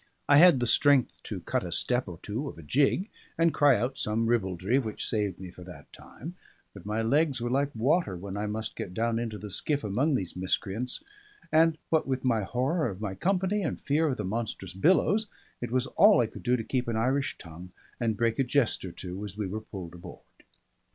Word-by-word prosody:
I 145 - +6
had 170 -3 +7
the 120 - +1
strength 140 +1 +3
to - - -5
cut - - -1
a 90 - -6
step 125 +7 +1
or 85 -2 -7
two 120 +7 -3
of - - -11
a 85 - -10
jig, 140 - +2 0.3
and 165 0 +3
cry 145 -3 +5
out 125 +5 -2
some 110 +2 0
ribaldry, 105 0 +1
which 110 -5 -4
saved 105 -5 -1
me 95 -2 -8
for 90 - -12
that 80 -6 -13
time; 165 +7 -10 0.4
but 100 -1 -11
my 110 +2 -1
legs 140 +3 +2
were 120 +1 -2
like 140 +2 +1
water 130 - +1
when 95 +2 -7
I 105 +1 -2
must 110 +1 -3
get 90 - -6
down 115 0 0
into 115 -2 -4
the 105 -1 -8
skiff 145 +9 -1
among 130 +9 +1
these 95 -8 -2
miscreants; 95 +6 -2 0.5
and 160 0 +4
what 160 -3 +2
with 130 -1 -2
my 115 -4 +2
horror 130 - 0
of 95 -2 -7
my 105 -3 -3
company 190 - 0
and - - -2
fear 155 +2 +1
of 135 -3 -1
the - - -3
monstrous 100 -3 -4
billows, 190 - +3 0.3
it 120 - -3
was 130 +1 +1
all 205 +9 +5
I 120 - +4
could - - -9
do 125 0 +2
to 115 - -3
keep 125 +2 -2
an 115 - -1
Irish 135 +5 0
tongue 85 +2 -11 0.3
and 115 -3 0
break 115 +3 0
a - - +4
jest 130 -1 +1
or 95 - -5
two 90 +3 -7
as 105 -1 -8
we 105 - -2
were 105 +4 -4
pulled 95 -6 -8
aboard. 85 0 -11
115 Hz, 220 wpm, -28 LUFS, 100-140 Hz, 0.5 s, had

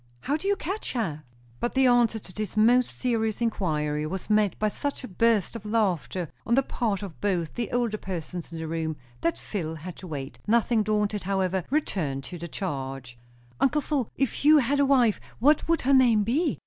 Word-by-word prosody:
"How 285 - 0
do 315 +6 -3
you 405 - +3
catch 390 +4 -4
her?" 165 - -2 0.4
But 240 - -2
the 265 0 +4
answer 240 -3 +4
to 195 -4 -11
this 215 0 -4
most 245 +3 +5
serious 225 -4 0
inquiry 155 -9 -1
was 190 +5 -4
met 210 -3 +3
by 215 - +1
such 280 +7 -3
a - - -5
burst 220 +1 +2
of 230 - -6
laughter 190 -5 0 0.2
on 235 - +2
the 270 - +4
part 215 -6 -2
of 190 -5 -9
both 180 -6 0
the 235 -3 -3
older 235 -3 0
persons 175 -2 -5
in 165 - -6
the 160 0 -4
room, 160 -1 -2 0.2
that 170 - 0
Phil 160 -6 -4
had 165 +3 -8
to 185 - -9
wait; 140 -4 -6
nothing 230 0 +3
daunted, 210 -1 0
however, 190 -1 0
returned 165 - -1
to 175 +4 -7
the 170 - -5
charge. 135 - -5 0.4
"Uncle 295 +3 +3
Phil, 275 -6 -1
if 270 0 -1
you 305 +1 +8
had 280 +1 +2
a 280 - +5
wife, 250 -6 +3 0.2
what 290 +6 +3
would 330 0 +2
her 275 +2 +2
name 240 -5 +5
be?" 285 - 0
215 Hz, 200 wpm, -26 LUFS, 175-245 Hz, 0.4 s, you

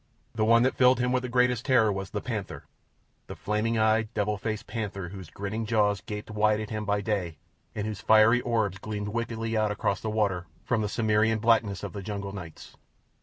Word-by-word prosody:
The 110 - 0
one 115 +1 +5
that 130 - +2
filled 125 0 +4
him 125 0 +1
with 125 0 +1
the 125 - -5
greatest 125 -1 +2
terror 125 -6 +4
was 95 0 -5
the - - -4
panther—the - - -9
flaming 110 +2 -1
eyed, 110 0 +2
devil 105 0 0
faced 110 +1 -4
panther 100 -5 -4
whose 95 -3 -9
grinning 100 +3 -4
jaws 105 -3 +1
gaped 105 -1 -7
wide 105 0 +2
at 110 0 -6
him 105 -1 -3
by 100 0 0
day, 95 -6 -2 0.4
and 105 - -2
whose 110 -2 -5
fiery 110 +3 +5
orbs 110 -6 -1
gleamed 105 0 -4
wickedly 115 0 -3
out 110 -1 +2
across 105 -1 -1
the 110 - -3
water 100 -5 0 0.2
from 120 -3 0
the 105 - -1
Cimmerian 110 0 +2
blackness 110 -3 +2
of - - -5
the 100 - -5
jungle 100 0 -5
nights. 90 -5 -10
110 Hz, 200 wpm, -27 LUFS, 105-115 Hz, 0.4 s, one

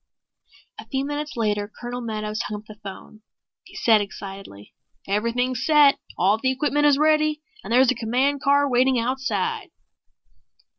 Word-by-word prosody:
A - - -10
few 270 0 -2
minutes 290 +1 -4
later 210 -2 -1
Colonel 245 0 -5
Meadows 215 -2 -3
hung 210 0 -5
up - - -30
the 215 - -11
phone. 205 +2 -10 0.4
He - - -16
said 220 -2 +4
excitedly, 195 - -9 0.3
"Everything's 235 +5 -1
set. 295 -2 +5 0.2
All 200 +5 +2
the 260 - +1
equipment 295 +2 +1
is 285 -2 +4
ready 305 0 +2 0.2
and - - -8
there's 255 +1 +5
a - - +1
command 260 +5 0
car 285 +1 +3
waiting 255 0 +2
outside." 275 - -2
250 Hz, 150 wpm, -23 LUFS, 215-285 Hz, 0.4 s, set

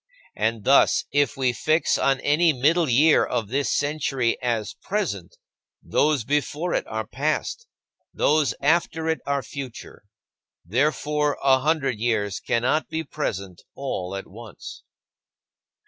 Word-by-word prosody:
And 110 -1 -1
thus, 140 +5 +4
if 145 -4 +1
we 130 -2 +1
fix 155 +5 +1
on 135 -1 +2
any 155 +2 +3
middle 155 +5 +2
year 145 +6 +5
of 115 -5 -2
this 135 -3 0
century 135 -5 0
as 115 -4 -1
present, 185 - -3 0.5
those 150 -5 +1
before 150 +6 -1
it - - -1
are 110 0 -3
past, 155 - -2 0.4
those 150 -1 +2
after 160 +2 +1
it 160 0 0
are 140 -1 0
future. 130 -6 -9 0.6
Therefore, 150 - 0
a 135 -1 +5
hundred 135 -5 0
years 105 -4 0
cannot 125 +7 0
be 160 0 -3
present 100 - -5
all 100 -9 -4
at 95 - -5
once. 110 0 -11
140 Hz, 130 wpm, -24 LUFS, 115-155 Hz, 0.6 s, year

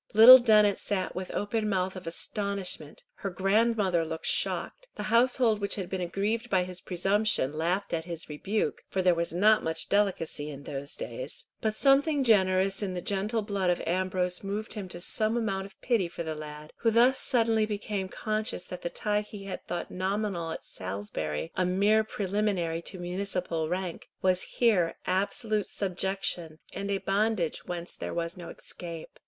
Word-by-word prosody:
Little 245 +4 +12
Dennet 210 -4 +4
sat 190 -3 -2
with 185 0 -4
open 215 +1 -1
mouth 190 -1 0
of 185 -2 -8
astonishment, 200 - -3
her 195 - -3
grandmother 195 -1 +2
looked 160 0 -5
shocked, - - 0
the 210 - -4
household 235 -3 +4
which 200 - -1
had 190 -4 -5
been 190 -1 -2
aggrieved 205 +7 -1
by 185 -2 +3
his 180 0 -7
presumption 195 -4 +1
laughed 175 +6 -1
at 165 -1 -1
his 170 -2 -5
rebuke, 195 +8 -2
for 190 - -1
there 180 -1 +5
was 170 0 -1
not 210 +5 +4
much 160 0 -3
delicacy 185 -7 0
in 140 -1 -8
those 140 0 -4
days; - - -6 0.2
but 215 -1 0
something 280 +3 +4
generous 195 -4 +3
in 190 -3 -2
the - - -2
gentle 210 +4 -1
blood 200 -3 0
of 175 - +2
Ambrose 180 0 0
moved 205 +3 -4
him 200 -4 -6
to 175 - -7
some 215 +5 +1
amount 195 -4 -1
of 195 - -21
pity 230 -8 +1
for 170 0 -6
the 160 -1 -3
lad, 150 0 -9
who 230 - +2
thus 240 +4 +5
suddenly 225 -3 +2
became 205 -2 -3
conscious 215 -3 -2
that 180 -1 -8
the 175 - -2
tie 210 +3 0
he 210 -1 -10
had 195 - -6
thought 175 -1 -4
nominal 190 -2 -2
at - - -6
Salisbury, 95 - -4
a 185 - +1
mere 200 +4 +3
preliminary 195 -5 -1
to 185 - -7
municipal 180 -3 -2
rank, 180 -1 -4
was 185 -1 +3 0.2
here 195 -9 +3
absolute 205 +3 0
subjection, 185 -4 -2 0.2
and 200 +1 -4
a 200 - +1
bondage 195 -3 0
whence 175 0 -5
there - - -5
was 170 0 -2
no 175 -2 -8
escape. 170 -2 -8
195 Hz, 175 wpm, -29 LUFS, 175-215 Hz, 0.2 s, Little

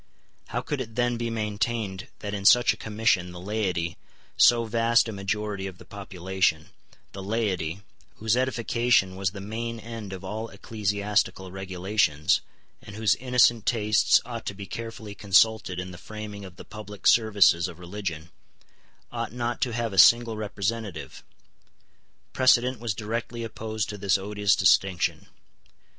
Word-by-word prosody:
How - - -2
could 145 -3 -3
it 115 -3 -7
then 120 0 +1
be 120 0 -2
maintained 110 -2 -2
that 105 0 -4
in 100 -1 -4
such 120 +4 +6
a - - -10
Commission 105 -5 0
the 90 - -8
laity, 90 -4 -2 0.4
so 120 -1 +5
vast 115 +1 +3
a - - -4
majority 100 0 -3
of 95 -2 -9
the - - -14
population, 95 -4 -2 0.4
the 95 - -8
laity, 95 -4 -2 0.3
whose 110 +1 +1
edification 120 -5 +1
was 95 0 0
the 100 +1 -9
main 115 +3 -5
end 115 -3 -8
of 95 0 -7
all 110 +4 -5
ecclesiastical 100 -3 -1
regulations, 95 -4 0 0.4
and 105 - -11
whose 110 -1 +3
innocent 120 -3 +3
tastes 105 -3 +4
ought 115 -2 -7
to 100 - -3
be 100 0 -7
carefully 115 -1 -7
consulted 100 -1 +2
in 90 0 -5
the 85 - -11
framing 105 -1 -8
of 90 -2 -12
the - - -12
public 105 0 -10
services 100 -6 +5
of 85 -3 -10
religion, 90 -3 -6 0.8
ought 115 -1 -4
not 120 0 -3
to 125 - +1
have 115 -2 -2
a 95 - +2
single 115 +1 +6
representative? 105 -3 -4 1.1
Precedent 130 -1 +3
was 115 -4 -2
directly 115 +2 -4
opposed 110 -1 -4
to 105 -1 -6
this 100 0 +2
odious 100 0 +1
distinction. 95 -3 +2
105 Hz, 150 wpm, -26 LUFS, 95-115 Hz, 1.1 s, such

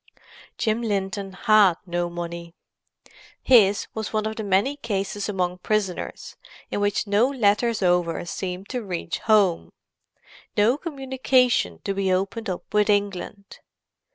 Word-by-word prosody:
Jim 220 +1 0
Linton 200 -2 -2
had 210 -2 +4
no 175 -1 -2
money. 170 0 -7 0.8
His 205 -6 +4
was 220 -1 -4
one 215 -1 -1
of 220 0 -3
the 220 - -4
many 200 +8 +1
cases 205 -4 -3
among 180 -2 -2
prisoners 200 -2 -3 0.3
in - - -1
which 205 +1 0
no 205 +4 +3
letters 230 -3 +1
over 175 -2 +1
seemed 180 +2 -5
to 250 - -3
reach 180 -3 -4
home—no 210 +3 -1
communication 260 - +1
to 195 - -1
be 195 -1 0
opened 195 +4 -1
up 180 - -4
with 210 0 +3
England. 200 0 -2
205 Hz, 125 wpm, -24 LUFS, 185-220 Hz, 0.8 s, had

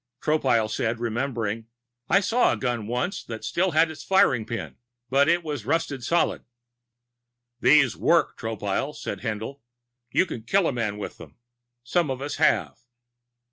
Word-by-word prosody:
Tropile 130 -8 +2
said, 115 +1 -2
remembering: 115 -2 -2 0.4
"I 195 - +5
saw 230 +5 +3
a - - -3
gun 120 -4 -2
once 125 - -2
that 110 -1 -7
still 185 +8 +1
had 160 -1 +3
its 155 - -10
firing 130 - +3
pin. 115 - -5 0.3
But 140 +3 +4
it 170 +1 +2
was 150 -7 -4
rusted 140 -1 -1
solid." 170 +7 +1 1.2
"These 140 -5 +5
work, - - +2
Tropile," 110 +5 -3
said 100 - -5
Haendl. 110 +6 -4 0.5
"You 185 - +3
can 120 - -6
kill 190 - +2
a - - 0
man 110 -4 -2
with 105 - -7
them. - - -12 0.5
Some 160 +5 +1
of 130 -1 -2
us 145 +1 -4
have." - - +2
130 Hz, 155 wpm, -25 LUFS, 115-160 Hz, 1.2 s, I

